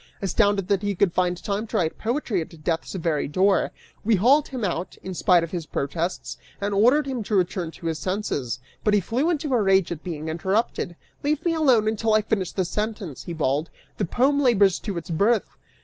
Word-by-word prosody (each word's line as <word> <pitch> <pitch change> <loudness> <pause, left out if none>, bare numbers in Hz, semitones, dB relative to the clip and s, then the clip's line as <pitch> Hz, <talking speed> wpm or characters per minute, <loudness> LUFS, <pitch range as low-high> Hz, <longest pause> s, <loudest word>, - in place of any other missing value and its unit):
Astounded 195 0 +1
that 200 -2 +1
he 205 -1 -1
could 180 -1 +2
find 180 -1 +1
time 205 +2 -2
to 220 - -2
write 165 -5 -1
poetry 230 - -1
at 160 -1 -10
death's 165 +3 -2
very 165 -4 0
door, 190 +7 +2 0.3
we 220 +1 +3
hauled 265 +10 +4
him 255 -5 -3
out, 175 -1 -3
in 190 - -5
spite 180 -1 +4
of 170 - -5
his 170 -4 -4
protests, 165 +6 -3 0.2
and 200 +1 -2
ordered 250 +9 +4
him 260 -3 -3
to 210 0 -2
return 180 -2 0
to 165 - -12
his 160 -1 -1
senses, 165 - -2 0.3
but 210 -1 +3
he - - +5
flew 245 - 0
into 300 -4 -1
a 240 - +3
rage 195 -3 +3
at 165 -3 -4
being 160 -3 -5
interrupted; 190 +2 -1 0.3
"Leave 300 +2 -1
me 340 - +2
alone 260 -9 +3
until 220 0 +1
I 215 - +3
finish 200 -4 -1
this 185 -2 -2
sentence," 210 - -4
he 170 - -5
bawled; 150 0 0 0.3
"the - - 0
poem 275 - +2
labors 205 -8 +4
to 200 -5 -4
its 170 - -6
birth." 205 +6 +1
195 Hz, 210 wpm, -24 LUFS, 170-225 Hz, 0.3 s, he